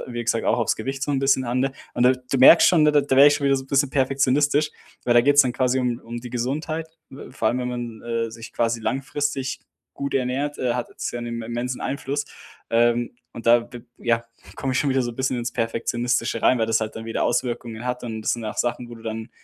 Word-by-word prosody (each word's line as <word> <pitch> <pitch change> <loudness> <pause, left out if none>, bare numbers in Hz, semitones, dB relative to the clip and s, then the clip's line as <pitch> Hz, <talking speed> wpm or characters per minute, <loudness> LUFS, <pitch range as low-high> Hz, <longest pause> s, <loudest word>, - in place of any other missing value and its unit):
wie 120 -1 -5
gesagt, 115 0 0
auch - - +3
aufs 115 -4 +1
Gewicht 135 +4 -4
so 145 - -1
'n 140 - +1
bisschen 135 -1 +2
an, 120 +1 -1
ne? 135 +1 0 0.2
Und 120 - +2
da 125 - +6
du 130 +1 -3
merkst 135 +6 +8
schon, 165 -4 +4
ne, 150 - +4
da 145 - +5
werde 135 +2 +7
ich 145 - +6
schon 145 - -3
wieder 140 0 +4
so 135 0 -6
bisschen 140 0 +2
perfektionistisch, 140 +2 +2 0.3
weil 120 - +3
da 120 - +8
geht's 145 +3 +6
dann 125 - -1
quasi 130 +1 +1
um 120 -2 -1
um 120 +1 -6
die 125 0 -9
Gesundheit. 155 +7 -3 0.2
We 135 - -11
vor - - 0
allem, 125 - -1
wenn 125 - -2
man, 120 -2 -6
äh, 115 -1 -2
sich 115 0 -10
quasi 115 0 0
langfristig 135 +2 -2 0.4
gut 140 0 -4
ernährt, 135 +3 -1
äh, 125 -2 0
hat 125 - -3
es - - -3
ja 120 - -5
'nen 115 -1 -5
immensen 120 +2 -4
Einfluss, 140 +1 -3 0.5
ähm, 120 +1 +2 0.2
und 115 - -9
da, 115 0 +4
w 120 - -8 0.2
ja, 115 -1 0 0.3
komme 135 - -2
ich 130 - +1
schon 145 - 0
wieder 130 0 +2
so 120 - -3
'n - - -16
bisschen 130 -1 0
ins 120 0 -3
Perfektionistische 115 0 -1
rein, 125 - +4
weil 115 - +1
das 115 0 +2
halt 110 -1 -4
dann 110 - -6
wieder 115 - -1
Auswirkungen 120 -2 -2
hat 125 0 -3
und 110 -2 -5
das - - +1
sind 120 -1 -7
auch 105 - -5
Sachen, 120 0 -1
wo 120 - -9
du 115 - -14
dann 110 0 -5
125 Hz, 250 wpm, -23 LUFS, 115-135 Hz, 0.5 s, merkst